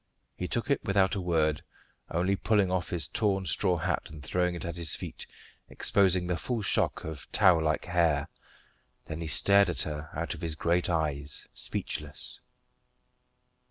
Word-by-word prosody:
He 90 Hz, -, -4 dB
took 120 Hz, +7 st, -1 dB
it 140 Hz, -, +1 dB
without 100 Hz, -1 st, +2 dB
a 100 Hz, -, -1 dB
word, 80 Hz, -4 st, +1 dB, 0.5 s
only 90 Hz, +4 st, +1 dB
pulling 100 Hz, -2 st, +2 dB
off 90 Hz, -1 st, -1 dB
his 80 Hz, -3 st, 0 dB
torn 100 Hz, -3 st, 0 dB
straw 90 Hz, +2 st, +2 dB
hat 85 Hz, +1 st, -2 dB
and 80 Hz, -2 st, -10 dB
throwing 90 Hz, +1 st, 0 dB
it 85 Hz, -, -6 dB
at 85 Hz, -1 st, -4 dB
his 85 Hz, -4 st, 0 dB
feet, -, -, -6 dB, 0.4 s
exposing 95 Hz, -3 st, +2 dB
the 90 Hz, -1 st, -1 dB
full 115 Hz, +3 st, -2 dB
shock -, -, +1 dB
of 80 Hz, -5 st, -7 dB
tow 95 Hz, -5 st, +5 dB
like 80 Hz, -1 st, 0 dB
hair; 85 Hz, -5 st, +2 dB, 0.8 s
then 80 Hz, +1 st, -6 dB
he 80 Hz, -, -3 dB
stared 100 Hz, +5 st, +5 dB
at 90 Hz, -, 0 dB
her 75 Hz, +1 st, -5 dB
out 85 Hz, +2 st, -2 dB
of -, -, -10 dB
his 80 Hz, -3 st, -2 dB
great 85 Hz, +4 st, +1 dB
eyes, 75 Hz, -4 st, -1 dB
speechless. 75 Hz, 0 st, -4 dB
85 Hz, 165 wpm, -29 LUFS, 80-95 Hz, 0.8 s, tow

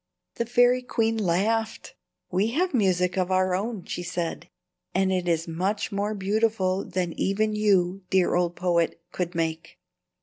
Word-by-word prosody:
The 235 Hz, -, -1 dB
fairy 245 Hz, +1 st, +4 dB
queen 225 Hz, -2 st, 0 dB
laughed. 220 Hz, +3 st, 0 dB, 0.4 s
"We 190 Hz, +4 st, +2 dB
have 360 Hz, +5 st, +1 dB
music 185 Hz, -5 st, +2 dB
of 180 Hz, 0 st, 0 dB
our 185 Hz, 0 st, +2 dB
own," 200 Hz, 0 st, -3 dB
she -, -, -4 dB
said, 175 Hz, -1 st, -4 dB, 0.5 s
"and 190 Hz, 0 st, +2 dB
it 180 Hz, -1 st, -1 dB
is 165 Hz, -1 st, 0 dB
much 185 Hz, +6 st, -2 dB
more 205 Hz, +2 st, -1 dB
beautiful 200 Hz, -1 st, 0 dB
than 180 Hz, -2 st, -2 dB
even 215 Hz, +2 st, +1 dB
you, 195 Hz, -3 st, +2 dB
dear 190 Hz, -2 st, +3 dB
old 175 Hz, -1 st, +1 dB
poet, 170 Hz, -2 st, 0 dB
could 180 Hz, -1 st, -3 dB
make." 165 Hz, -1 st, -3 dB
190 Hz, 155 wpm, -26 LUFS, 180-215 Hz, 0.5 s, fairy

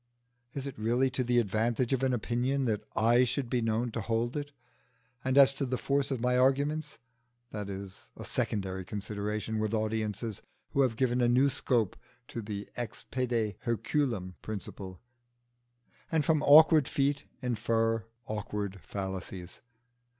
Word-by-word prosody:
Is 140 Hz, -1 st, -3 dB
it 140 Hz, -5 st, -6 dB
really 120 Hz, +4 st, +2 dB
to 130 Hz, 0 st, -1 dB
the 120 Hz, 0 st, +2 dB
advantage 115 Hz, +3 st, +1 dB
of 135 Hz, -, +1 dB
an 130 Hz, -1 st, +2 dB
opinion 125 Hz, +3 st, 0 dB
that 110 Hz, -3 st, 0 dB
I 120 Hz, +3 st, +5 dB
should 125 Hz, 0 st, -2 dB
be 125 Hz, -, +2 dB
known 115 Hz, +1 st, 0 dB
to 115 Hz, -, -3 dB
hold 115 Hz, +3 st, -1 dB
it? 145 Hz, -1 st, -4 dB, 0.7 s
And 130 Hz, +1 st, +1 dB
as 135 Hz, -1 st, +8 dB
to 140 Hz, -, -2 dB
the 130 Hz, 0 st, -1 dB
force 140 Hz, +1 st, 0 dB
of 135 Hz, -3 st, -1 dB
my 125 Hz, +1 st, +2 dB
arguments, 145 Hz, +4 st, +1 dB, 0.5 s
that 105 Hz, -2 st, -5 dB
is 95 Hz, -1 st, -8 dB
a -, -, -7 dB
secondary 95 Hz, -2 st, -1 dB
consideration 105 Hz, +2 st, -3 dB
with 110 Hz, +1 st, 0 dB
audiences 110 Hz, 0 st, -2 dB, 0.3 s
who 140 Hz, -, +2 dB
have 125 Hz, -4 st, +2 dB
given 125 Hz, 0 st, +1 dB
a 120 Hz, -, +4 dB
new 130 Hz, +4 st, +4 dB
scope 120 Hz, -6 st, 0 dB, 0.3 s
to 115 Hz, -, -4 dB
the 105 Hz, -1 st, -5 dB
ex 120 Hz, -4 st, -5 dB
pede 120 Hz, -6 st, 0 dB
Herculem 115 Hz, -4 st, -1 dB
principle, 95 Hz, -3 st, -7 dB, 1.1 s
and 160 Hz, -3 st, +2 dB
from 155 Hz, -2 st, +3 dB
awkward 155 Hz, 0 st, +7 dB
feet 140 Hz, -1 st, 0 dB
infer 115 Hz, -2 st, 0 dB, 0.2 s
awkward 105 Hz, -3 st, -4 dB
fallacies. 95 Hz, -2 st, -6 dB
120 Hz, 150 wpm, -30 LUFS, 105-130 Hz, 1.1 s, as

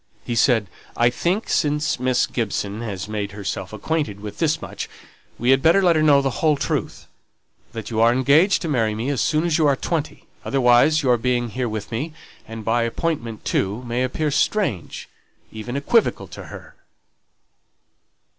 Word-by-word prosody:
He 120 Hz, -, -3 dB
said 115 Hz, -2 st, +3 dB, 0.3 s
"I 120 Hz, +1 st, +4 dB
think 180 Hz, -, -1 dB
since 150 Hz, -2 st, 0 dB
Miss 125 Hz, -1 st, +2 dB
Gibson 105 Hz, -2 st, -3 dB
has 100 Hz, -4 st, -5 dB
made 105 Hz, -2 st, -4 dB
herself 100 Hz, -2 st, -5 dB
acquainted 110 Hz, -1 st, -2 dB
with 105 Hz, 0 st, -8 dB
this 160 Hz, -1 st, +1 dB
much, -, -, -7 dB, 0.5 s
we 120 Hz, +2 st, +2 dB
had 135 Hz, 0 st, +4 dB
better 165 Hz, +6 st, +5 dB
let 175 Hz, -2 st, +4 dB
her 155 Hz, -, +2 dB
know 145 Hz, -2 st, +5 dB
the 135 Hz, -2 st, -2 dB
whole 155 Hz, -2 st, +3 dB
truth -, -, -3 dB, 0.7 s
that 115 Hz, 0 st, -6 dB
you 110 Hz, -, -1 dB
are 115 Hz, +1 st, +6 dB
engaged 145 Hz, +11 st, +3 dB
to -, -, -2 dB
marry 115 Hz, -7 st, 0 dB
me 115 Hz, +5 st, -3 dB
as 135 Hz, -, -1 dB
soon 155 Hz, 0 st, +1 dB
as 165 Hz, -1 st, +1 dB
you 155 Hz, -, +4 dB
are 140 Hz, -, +3 dB
twenty; 155 Hz, +2 st, -3 dB, 0.2 s
otherwise 135 Hz, +4 st, +3 dB
your 125 Hz, -2 st, +3 dB
being 120 Hz, 0 st, 0 dB
here 125 Hz, +1 st, -2 dB
with 110 Hz, 0 st, -5 dB
me, 145 Hz, +8 st, -3 dB, 0.3 s
and 115 Hz, -1 st, -8 dB
by 120 Hz, +1 st, +2 dB
appointment 115 Hz, -2 st, -3 dB
too, 105 Hz, +6 st, -1 dB
may 120 Hz, 0 st, -2 dB
appear 150 Hz, +4 st, -1 dB
strange 140 Hz, -, -1 dB, 0.4 s
even 110 Hz, +3 st, -6 dB
equivocal 220 Hz, +11 st, +1 dB
to -, -, -9 dB
her." -, -, -11 dB
125 Hz, 175 wpm, -22 LUFS, 110-150 Hz, 0.7 s, are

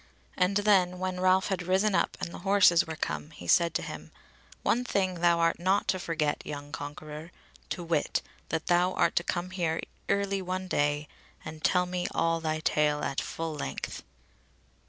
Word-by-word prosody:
And 180 Hz, +2 st, +2 dB
then, 190 Hz, -3 st, +3 dB
when 185 Hz, 0 st, -3 dB
Ralph 185 Hz, +1 st, +3 dB
had 190 Hz, -2 st, -1 dB
risen 190 Hz, +4 st, +2 dB
up -, -, +1 dB
and 170 Hz, -, -4 dB
the -, -, -8 dB
horses 195 Hz, -3 st, +5 dB
were 160 Hz, -, -4 dB
come, 155 Hz, -1 st, -3 dB
he 160 Hz, -, -11 dB
said 170 Hz, -3 st, +4 dB
to -, -, 0 dB
him: -, -, -8 dB, 0.5 s
"One 245 Hz, -, +2 dB
thing 185 Hz, -6 st, 0 dB
thou 170 Hz, -1 st, +4 dB
art 165 Hz, 0 st, +2 dB
not 190 Hz, +3 st, +2 dB
to 185 Hz, -, +1 dB
forget, 160 Hz, -4 st, -1 dB
young 145 Hz, 0 st, -7 dB
conqueror, 150 Hz, +3 st, -7 dB, 0.4 s
to 175 Hz, -, -3 dB
wit, 165 Hz, -3 st, 0 dB, 0.3 s
that 160 Hz, -1 st, -2 dB
thou 180 Hz, +1 st, +3 dB
art 170 Hz, -, +2 dB
to 170 Hz, -, +3 dB
come 175 Hz, +1 st, -2 dB
here 170 Hz, -3 st, -1 dB, 0.3 s
early 200 Hz, -1 st, +1 dB
one 185 Hz, 0 st, -3 dB
day, 145 Hz, -2 st, 0 dB, 0.4 s
and 155 Hz, 0 st, -8 dB
tell 180 Hz, -1 st, +3 dB
me 180 Hz, 0 st, -2 dB
all 165 Hz, 0 st, +2 dB
thy 155 Hz, -1 st, -1 dB
tale 150 Hz, -1 st, +1 dB
at 140 Hz, -, -1 dB
full 165 Hz, -1 st, -4 dB
length." 70 Hz, -, -5 dB
175 Hz, 180 wpm, -29 LUFS, 155-185 Hz, 0.5 s, horses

